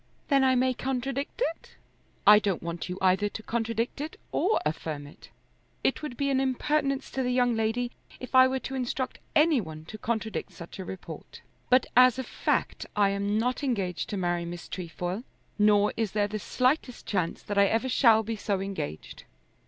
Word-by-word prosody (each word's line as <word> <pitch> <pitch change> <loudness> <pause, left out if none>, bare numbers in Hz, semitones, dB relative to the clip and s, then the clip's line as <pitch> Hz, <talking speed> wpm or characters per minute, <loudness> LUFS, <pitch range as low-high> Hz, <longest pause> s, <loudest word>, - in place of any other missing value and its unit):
"Then 275 -2 +4
I 260 -1 +4
may 255 +1 +2
contradict 270 - -2
it." - - -21 0.5
"I 210 0 +9
don't 200 -5 -1
want 170 +1 -4
you 180 - -4
either 190 +2 +3
to 220 - -8
contradict 230 +3 -2
it 310 +2 -6
or 410 +5 +2
affirm 150 -1 -3
it. 145 - -14 0.5
It 270 - +1
would 280 -6 -6
be 280 -1 0
an 265 - +2
impertinence 275 +1 0
to 265 - -2
the 250 - 0
young 245 -1 +2
lady 225 +2 0 0.3
if 255 - -8
I 260 0 +8
were 260 0 -1
to 270 - -6
instruct 260 0 -3 0.2
any 305 -4 +5
one 155 -3 -9
to 215 +6 -9
contradict 220 -3 -3
such 170 +2 -10
a 190 - -5
report. 190 +1 -9 0.3
But 255 0 +5
as 255 0 +7
a 260 - -2
fact - - -1
I 205 -1 +4
am 200 +1 0
not 250 +5 0
engaged 195 -10 -1
to 205 - -3
marry 175 -2 0
Miss 175 0 -7
Trefoil, 180 +3 -4 0.4
nor 210 0 +4
is 220 -4 -1
there 205 -1 +2
the 215 +1 -4
slightest 255 +3 0
chance 180 -5 -2
that 205 -1 -1
I 200 - +6
ever 225 +5 +1
shall 230 -3 +5
be 225 +1 -3
so 205 -2 -1
engaged." 190 - -6
225 Hz, 190 wpm, -28 LUFS, 195-260 Hz, 0.5 s, I